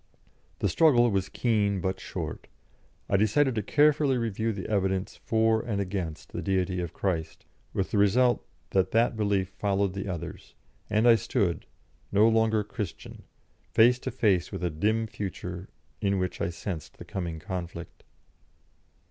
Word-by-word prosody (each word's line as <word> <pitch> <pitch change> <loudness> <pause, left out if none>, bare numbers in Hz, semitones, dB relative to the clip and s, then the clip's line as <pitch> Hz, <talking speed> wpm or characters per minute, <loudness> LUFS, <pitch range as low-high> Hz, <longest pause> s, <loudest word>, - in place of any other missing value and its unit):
The - - 0
struggle 120 -8 +4
was 95 -1 0
keen 105 -5 +1
but 95 +1 -2
short; - - -6 0.6
I 100 - +2
decided 125 +7 +3
to 110 - -1
carefully 145 +3 +3
review 115 -1 -1
the 100 -3 -5
evidence 95 -2 -1
for 110 0 +3
and 105 -4 -2
against 90 -5 -4
the - - -3
Deity 95 -1 0
of 85 -3 -4
Christ, 80 -5 -3 0.3
with 95 - -2
the 105 - +2
result 120 +5 +3 0.3
that 95 -1 +2
that 115 +1 +3
belief 100 -3 0
followed 100 0 0
the 100 +1 -4
others, 85 -4 -6 0.3
and 110 +3 +3
I 120 - +9
stood, 100 -6 0 0.4
no 105 +2 +5
longer 110 -1 +3
Christian, 105 -3 -7 0.5
face 120 +2 +5
to 130 - -4
face 105 -8 +1
with - - -5
a 90 - 0
dim 110 +8 +1
future 95 -3 -6 0.3
in 100 -2 +1
which 90 -1 -2
I - - 0
sensed 85 -2 -6
the - - -10
coming 85 -4 -4
conflict. 85 0 -7
100 Hz, 155 wpm, -28 LUFS, 95-110 Hz, 0.6 s, I